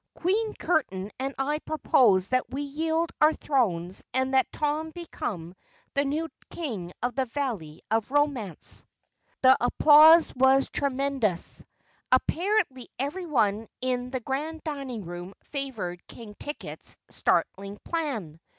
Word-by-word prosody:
Queen 425 +5 0
Curtain 200 - -1
and 270 +1 -3
I 290 +3 0
propose 220 -12 +3
that 255 0 +1
we 280 +2 -3
yield 320 +3 -1
our 305 +1 +6
thrones 190 - 0
and 260 0 +1
that 265 -1 +3
Tom 305 +1 -1
become 205 - -6 0.4
the 280 - +2
new 300 +4 -1 0.2
King 215 - -5
of 245 0 0
the 265 +2 0
Valley 225 - -4
of 225 -1 +1
Romance." 270 - 0 0.6
The 260 0 +8
applause 310 +6 +7
was 265 +1 +4
tremendous. 270 -9 -1 0.5
Apparently 310 - +1
everyone 260 - 0
in 250 -1 -1
the 260 -1 -3
Grand 305 +6 -3
Dining 275 - -5
Room 175 +2 -7
favored 225 -12 -5
King 225 -3 -10
Ticket's 295 +1 -7
startling 200 +1 0
plan. 235 - -3
265 Hz, 125 wpm, -27 LUFS, 215-300 Hz, 0.6 s, The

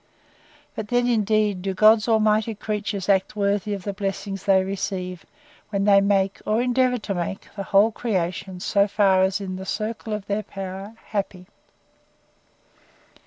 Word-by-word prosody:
—But 220 - -5
then, 245 +2 +1
indeed, 215 -4 +1
do 190 0 -3
God 215 +2 +5
Almighty's 220 -1 +2
creatures 210 -2 -3
act 195 0 +2
worthy 205 0 0
of 195 - -8
the 200 - -3
blessings 195 -1 -4
they 190 -1 +4
receive, 185 -2 -4 0.4
when 200 -2 -1
they 200 -1 +6
make, 195 -1 +1
or 215 +1 +1
endeavour 250 0 +2
to 205 -3 -4
make, 180 +2 -4
the 200 - -4
whole 200 +3 +4
creation, 190 -4 -3
so 200 +2 +2
far 195 -2 +3
as 190 0 +2
is - - -1
in 185 0 -4
the 190 - -6
circle 220 +1 -4
of 210 -2 -3
their 205 +1 -1
power, 195 +1 -7
happy! 195 -3 -3
200 Hz, 160 wpm, -23 LUFS, 195-215 Hz, 0.4 s, they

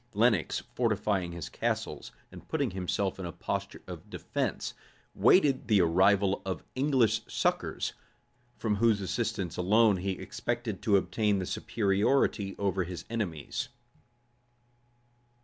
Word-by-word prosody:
Lenox, 110 -5 +2
fortifying 95 -5 0
his 85 -2 -6
castles, - - -3 0.2
and - - -12
putting 140 -8 0
himself 95 +1 -2
in 95 - -4
a - - -5
posture 85 - -4
of - - -9
defence, - - -3 0.4
waited 135 - +4
the 105 -3 +5
arrival 95 +3 +3
of 95 -1 -4
English 130 -5 +2
succors, - - -1 0.6
from 105 -3 0
whose 110 -1 +3
assistance 95 -1 -2
alone 105 +3 +4
he 95 +1 -1
expected 115 +2 -4
to 105 -2 +4
obtain 105 +1 +1
the 95 - -2
superiority 100 +1 +1
over 95 -2 0
his 90 0 -7
enemies. 90 -11 -3
100 Hz, 120 wpm, -30 LUFS, 95-115 Hz, 0.6 s, the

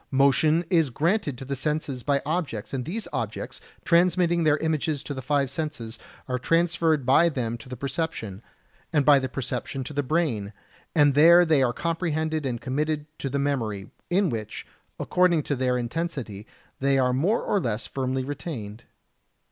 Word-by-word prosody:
Motion 150 +5 +3
is 165 -5 +3
transmitted 155 - 0
to 135 - -8
the 140 +1 -3
senses 145 -2 -2
by 140 +1 0
objects, 145 - -3
and 130 -2 -2
these 210 +8 -4
objects, - - -4 0.2
transmitting 175 0 +3
their 155 -1 +4
images 155 -2 -1
to 145 - -5
the 130 - -5
five 140 +1 +1
senses, 140 -7 -5 0.3
are 125 0 -1
transferred 165 -1 +2
by 155 +7 +5
them 120 -6 -2
to 120 - -13
the 125 - -6
perception, 135 - -4 0.5
and 150 -4 +2
by 145 -2 +7
the 130 -1 -3
perception 130 +1 -4
to 150 - -7
the 145 - 0
brain; 125 -9 -1 0.4
and 145 -3 +5
there 170 +5 +7
they 155 -4 +3
are 125 -2 +3
comprehended 160 -1 -1
and 120 -2 -3
committed 150 +3 -1
to 135 - -3
the 140 - -2
memory, 115 -9 -2 0.2
in 185 0 +2
which, 110 -3 -5 0.3
according 180 -4 +2
to 145 - -1
their 125 -1 +1
intensity, 120 -5 -4 0.3
they 135 0 +2
are 125 -1 +2
more 175 - +1
or 205 - +1
less 115 -4 -2
firmly 130 -1 -2
retained. 120 -7 -6
145 Hz, 170 wpm, -25 LUFS, 125-160 Hz, 0.5 s, by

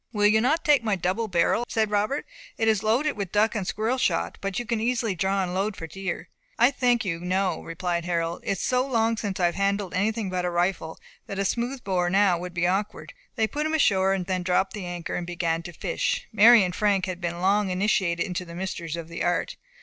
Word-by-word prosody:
"Will 210 -3 +1
you 215 +1 +5
not 310 +8 +1
take 290 -6 +4
my 215 -3 +1
double 190 +5 -1
barrel?" 180 +5 +2
said 220 -2 0
Robert. 210 +8 0 0.3
"It 225 - 0
is 215 -3 +3
loaded 240 +8 +2
with 200 -4 -4
duck 210 +2 +2
and 205 -5 -3
squirrel 225 +5 -1
shot, - - 0
but 195 -1 -3
you 245 - -2
can 230 -1 -1
easily 230 -2 0
draw 190 +2 0
and 180 -1 -3
load 200 +2 -1
for 165 - -6
deer." 190 +3 -5 0.3
"I 245 - +5
thank 245 -4 +1
you, 170 -3 -2
no," 185 +2 -1
replied 170 0 -3
Harold. 170 -1 -1
"It - - 0
is 190 - -5
so 250 0 +1
long 230 -4 +1
since 205 -4 -4
I 180 - +3
have 175 - +2
handled 200 -1 -1
anything 205 +1 -1
but 180 -1 -1
a 180 - 0
rifle, 175 -2 -1 0.3
that 195 - -5
a 195 - 0
smooth 245 +5 -2
bore 180 -2 0
now 190 -2 +3
would 180 0 -7
be 170 0 +1
awkward." 195 +4 -2 0.2
They 225 -3 +2
put 300 +7 -2
him 315 - 0
ashore, 195 -9 +3
then 185 0 -2
dropped 185 +2 0
anchor, 175 -4 -5
and 175 - -3
began 170 -2 -1
to 175 - -8
fish. - - -2
Mary 220 +1 +8
and 180 -1 -2
Frank 200 -1 +1
had 185 -1 -5
been 170 0 -3
long 195 +2 +2
initiated 180 -2 +1
into 180 -1 -3
the 170 -1 -10
mysteries 170 -3 -4
of 170 -1 -6
the 170 0 -5
art. 175 - 0
195 Hz, 230 wpm, -25 LUFS, 180-220 Hz, 0.3 s, Mary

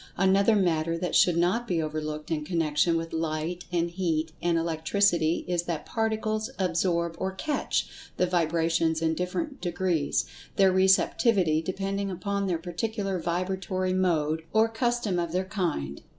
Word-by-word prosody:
Another 195 +3 +4
matter 165 -4 +1
that 180 +1 -3
should 175 -2 +4
not 185 +8 +1
be 175 -5 0
overlooked 155 0 -4
in 155 -2 -1
connection 165 0 +1
with 165 0 -5
Light 165 +2 -2
and 170 -1 0
Heat 165 -3 -1
and 170 -1 +2
Electricity 165 +1 +1
is 175 -1 -1
that 170 -3 -3
Particles 220 0 -1
absorb 170 -2 0
or 190 0 -1
"catch" 295 +10 -1 0.3
the 180 - +3
vibrations 165 -1 +1
in 160 0 +2
different 270 - -3
degrees, 175 -4 0 0.3
their 195 -1 +5
receptivity 190 -2 +3
depending 195 +3 -2
upon 200 +2 -2
their 175 -3 0
particular 195 +3 -3
vibratory 185 +2 -1
mode, 160 -4 +1
or 220 +1 +5
"custom 225 -4 0
of 170 -1 -2
their 185 +1 0
kind." 170 - -3
175 Hz, 145 wpm, -27 LUFS, 165-195 Hz, 0.3 s, their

